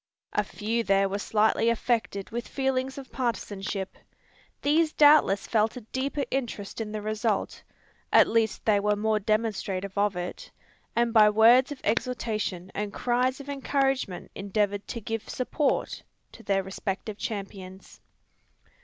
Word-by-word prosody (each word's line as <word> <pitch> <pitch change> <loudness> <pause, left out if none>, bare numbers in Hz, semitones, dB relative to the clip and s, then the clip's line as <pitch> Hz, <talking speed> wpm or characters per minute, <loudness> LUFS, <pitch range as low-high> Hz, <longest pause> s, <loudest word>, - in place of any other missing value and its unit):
A - - +2
few 225 +2 -2
there 195 -1 +3
were 200 +1 -3
slightly 220 +2 +2
affected 230 -4 -1
with 240 +2 -4
feelings 265 -1 -1
of 270 -1 -9
partisanship. 205 -5 -3 0.7
These 310 +2 +3
doubtless 290 -9 +5
felt 220 +1 +1
a - - -6
deeper 270 +5 -3
interest 230 -5 -3
in 215 -1 -4
the 215 -1 -4
result, 215 0 -1 0.5
at - - +7
least 225 -1 0
they 210 -2 +4
were 210 +1 +1
more 215 +1 +1
demonstrative 205 -3 -1
of 200 -1 +1
it; 180 0 -6 0.5
and 235 -1 +2
by 215 -2 +7
words 235 +6 +6
of 285 - -7
exhortation 215 -5 -2
and 205 0 -3
cries 250 +4 0
of 280 - -10
encouragement 270 -7 -1
endeavoured 200 0 -1
to 235 - -5
give 225 +1 -4
support 275 +3 -1 0.3
to - - -13
their 195 -1 0
respective 195 +2 -5
champions. 195 -3 -7
220 Hz, 140 wpm, -27 LUFS, 200-250 Hz, 0.7 s, at